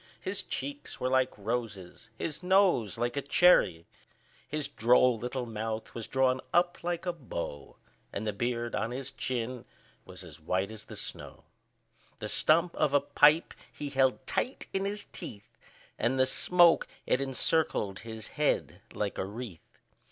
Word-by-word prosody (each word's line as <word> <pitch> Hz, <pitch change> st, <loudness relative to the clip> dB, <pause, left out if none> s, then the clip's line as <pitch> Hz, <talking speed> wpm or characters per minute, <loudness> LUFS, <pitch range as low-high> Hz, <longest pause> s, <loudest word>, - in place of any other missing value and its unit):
His -, -, -1 dB
cheeks 285 Hz, 0 st, -5 dB
were 130 Hz, -, 0 dB
like 130 Hz, -1 st, +2 dB
roses, 105 Hz, -4 st, -4 dB
his 155 Hz, 0 st, -4 dB
nose 180 Hz, -, +3 dB
like 120 Hz, +2 st, -1 dB
a 140 Hz, -, 0 dB
cherry; 135 Hz, -, +4 dB, 0.6 s
His 150 Hz, +2 st, -2 dB
droll 120 Hz, 0 st, +4 dB
little 125 Hz, +1 st, -3 dB
mouth 110 Hz, -1 st, -4 dB
was 115 Hz, -2 st, -5 dB
drawn 130 Hz, -1 st, +2 dB
up 175 Hz, 0 st, +2 dB
like 175 Hz, 0 st, -2 dB
a 175 Hz, -, 0 dB
bow, 85 Hz, -, -6 dB, 0.4 s
And 100 Hz, -, -4 dB
the 105 Hz, -, -1 dB
beard 120 Hz, +2 st, -2 dB
on 115 Hz, -, -1 dB
his 130 Hz, +2 st, -5 dB
chin 125 Hz, -1 st, -3 dB, 0.4 s
was -, -, -9 dB
as -, -, -12 dB
white 95 Hz, +5 st, -1 dB
as 110 Hz, -, -8 dB
the -, -, -9 dB
snow; -, -, -6 dB, 0.7 s
The -, -, -5 dB
stump 170 Hz, +2 st, +3 dB
of 150 Hz, -2 st, +2 dB
a -, -, +7 dB
pipe 145 Hz, +3 st, +4 dB, 0.2 s
he 145 Hz, -, -5 dB
held 130 Hz, -1 st, +2 dB
tight 255 Hz, -, -2 dB
in 195 Hz, 0 st, 0 dB
his 205 Hz, +1 st, -1 dB
teeth, 110 Hz, -, -9 dB, 0.4 s
And 130 Hz, +2 st, +1 dB
the 130 Hz, -, +6 dB
smoke, 175 Hz, +5 st, +4 dB, 0.2 s
it 130 Hz, -, +2 dB
encircled 135 Hz, -6 st, 0 dB
his 110 Hz, -1 st, -8 dB
head -, -, 0 dB
like 105 Hz, -1 st, -2 dB
a -, -, 0 dB
wreath. 105 Hz, -4 st, -9 dB
130 Hz, 160 wpm, -30 LUFS, 110-155 Hz, 0.7 s, a